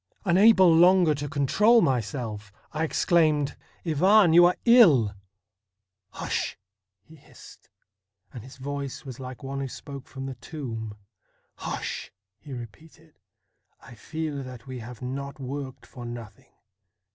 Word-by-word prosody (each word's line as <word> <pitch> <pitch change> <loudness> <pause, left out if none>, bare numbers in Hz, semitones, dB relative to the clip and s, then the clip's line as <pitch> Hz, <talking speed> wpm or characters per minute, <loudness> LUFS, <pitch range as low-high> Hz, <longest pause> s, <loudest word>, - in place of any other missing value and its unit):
Unable 185 -1 +6
longer 175 -1 +5
to 145 0 -5
control 210 - +4
myself, 115 - -2 0.2
I 155 +1 -1
exclaimed: 155 -3 +2 0.2
' - - -34
Ivan, 180 +3 +4
you 175 +1 +8
are 180 - +1
ill! 165 - +6 0.3
' 100 -1 -61
' 95 -1 -21
Hush! - - -2 0.2
' 95 0 -61
he 160 - -16
hissed, 140 - -17 0.6
and 120 -5 -8
his 130 +1 -13
voice 140 0 -5
was 130 -2 -8
like 130 +1 -8
one 135 +1 -4
who 135 - -3
spoke 135 0 -9
from 135 -1 -8
the 135 - -5
tomb 115 -5 -7 0.2
— 95 - -46
' - - -47
Hush! - - -4
' 95 +2 -60
he 145 - -11
repeated; 150 +7 -11 0.3
' - - -51 0.3
I - - -14
feel 150 +5 -5
that 130 -2 -10
we 130 -2 -7
have 120 +1 -10
not 140 +3 -5
worked 135 0 -6
for 125 - -11
nothing. 120 -3 -9
135 Hz, 155 wpm, -26 LUFS, 120-160 Hz, 0.6 s, you